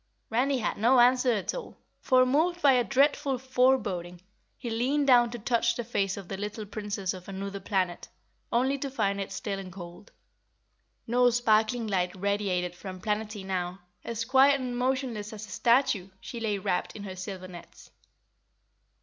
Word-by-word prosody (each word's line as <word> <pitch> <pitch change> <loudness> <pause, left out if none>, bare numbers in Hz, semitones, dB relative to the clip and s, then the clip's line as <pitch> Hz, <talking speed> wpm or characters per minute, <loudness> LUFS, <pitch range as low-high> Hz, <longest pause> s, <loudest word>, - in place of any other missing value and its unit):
Randy 265 +4 +2
had 220 - -2
no 245 +4 +5
answer 250 +1 +5
at 200 -4 -2
all, - - -7 0.2
for, 255 0 +4
moved 320 +7 +1
by 285 -5 +5
a 250 -2 +4
dreadful 275 +1 +2
foreboding, 250 -9 +1 0.4
he 240 -3 -5
leaned 265 +6 +1
down 245 -3 +6
to 240 - -6
touch 235 +1 +1
the 240 - -3
face 195 -4 -1
of 195 -3 -8
the 195 - -5
little 210 +2 -5
Princess 205 -2 -3
of 185 -1 -10
Anuther 195 +1 -5
Planet, 190 -3 -2 0.4
only 265 +4 +1
to 275 - -3
find 200 -7 -1
it 195 - -5
still 200 -2 -4
and 185 -1 -8
cold. 175 - -11 0.9
No 245 +1 +4
sparkling 230 0 +2
light 185 -4 -1
radiated 190 -2 -1
from 185 +1 -8
Planetty 210 -1 -3
now 185 -1 -3 0.2
as, 230 -1 -3
quiet 270 +3 +5
and 250 -2 -4
motionless 245 -4 -2
as 215 0 -7
a - - -16
statue, 235 -6 +2
she 235 - -7
lay 215 -3 -1
wrapped 180 -2 -2
in 205 - -7
her 190 -2 -6
silver 185 0 -7
nets. 175 -2 -13
220 Hz, 170 wpm, -28 LUFS, 195-255 Hz, 0.9 s, down